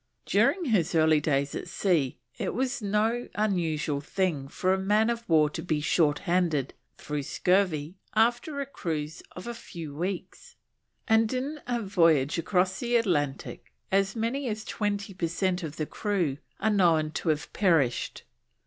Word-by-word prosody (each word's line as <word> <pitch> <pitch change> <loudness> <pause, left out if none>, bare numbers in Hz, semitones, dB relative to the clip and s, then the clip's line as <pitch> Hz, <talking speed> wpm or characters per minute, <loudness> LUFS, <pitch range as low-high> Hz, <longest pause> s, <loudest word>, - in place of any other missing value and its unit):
During 275 - +2
his 195 - +1
early 155 -1 +5
days 140 -1 0
at - - -5
sea 165 -10 +1 0.2
it - - -3
was 260 +1 -1
no 215 +4 0
unusual 165 -8 0
thing 155 -3 -1
for 185 +6 0
a - - +1
man 210 +4 +3
of 235 -2 -5
war 155 -2 +5
to 160 - -5
be 160 -3 -1
short 150 -1 +2
handed 170 -7 +1 0.2
through 150 -1 -3
scurvy 180 +1 +1 0.2
after 240 +6 +2
a 280 - -1
cruise 160 - -4
of 180 - -8
a 240 - -4
few 165 -9 -8
weeks, 180 +4 -5 0.5
and 220 -1 +4
in 270 +4 -3
a 240 -2 -1
voyage 165 -7 +3
across 185 +2 +1
the 240 -1 0
Atlantic 150 - -1 0.2
as 195 0 +2
many 240 +5 -1
as 215 -1 -3
twenty 205 -1 -2
per 180 -2 -1
cent 180 +2 0
of 155 -3 -5
the 155 - -1
crew 180 -8 -1 0.2
are 220 +1 +2
known 165 -6 +3
to 160 - -2
have 155 -1 -1
perished. 165 - +1
185 Hz, 160 wpm, -28 LUFS, 155-215 Hz, 0.5 s, early